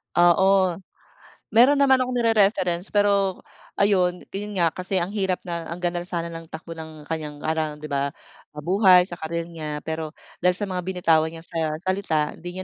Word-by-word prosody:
Oo, 185 +1 +4 0.7
meron 250 +6 +6
naman 265 -2 +4
akong 255 0 -1
ni-re-reference, 200 -6 +2
pero 200 -2 +2 0.4
ayun, 185 -3 +2
yun 205 +1 -5
nga 170 -3 +2
kasi 185 +1 -3
ang 180 +3 -1
hirap 190 -3 -1
na 170 -2 -5
ang 170 - -5
ganda 175 -1 -2
na 175 - -8
sana 170 -1 -3
ng 165 -1 -9
takbo 165 +1 -8
ng 160 -2 -9
kanyang 155 -2 -5
ana 155 -1 -1
'di 150 - -14
ba? 140 -1 -1 0.5
Ah, 150 - -7
buhay 185 -1 +6
sa 175 -2 -8
career 165 +1 -3
niya, 155 -3 -6
pero 160 -1 -4 0.2
dahil 180 0 +3
sa 205 - -2
mga 185 -2 -3
binitawan 165 -4 +2
niya 165 0 -9
sa 160 -3 -2
salita, 185 -6 0
hindi 175 +2 -9
175 Hz, 180 wpm, -24 LUFS, 160-195 Hz, 0.7 s, meron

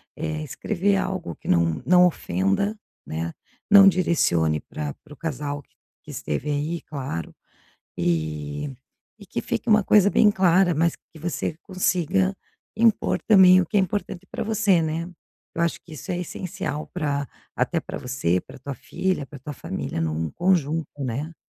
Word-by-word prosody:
eh, 155 0 -3
escrever 190 +7 0
algo 185 -2 -3
que - - -14
não 85 -2 +2
não 180 0 +6
ofenda, 125 - 0 0.3
né. 80 +1 -3 0.4
Não 200 -1 +10
direcione 85 - +2
pra 75 0 -6
para 150 - -13
o - - -14
casal 145 -2 -4
q - - -40 0.3
que - - -10
esteve 140 - -3
aí 150 +4 -1
claro. 130 - -5 0.6
E 80 - -2 0.4
e - - -13
que - - -4
fique - - -3
uma 215 -3 +5
coisa 205 -2 +6
bem 210 +1 +5
clara, 185 -2 +4
mas 165 +2 +1
que 160 - -19
você 160 -1 -3
consiga 185 0 +1 0.4
impor 225 -1 +2
também 185 -3 +8
o 180 - -1
que 210 - -2
é - - +6
importante 190 -1 -3
pra - - -3
você, 210 -5 +3
né. 165 +2 -2 0.4
Eu 165 - -1
acho 170 - 0
que 160 - -12
isso 155 - -5
é 175 - -2
essencial 160 -4 -4
pra 145 -4 -1 0.3
até - - +1
pra - - -7
você, 120 -9 0
pra - - -14
tua 140 +2 -6
filha, 180 +4 -2
pra 145 - -11
tua 140 +4 -7
família 115 - -4
num 80 0 -1
conjunto, 165 -4 +1 0.2
né. 140 +7 -3
160 Hz, 165 wpm, -24 LUFS, 130-185 Hz, 0.6 s, Não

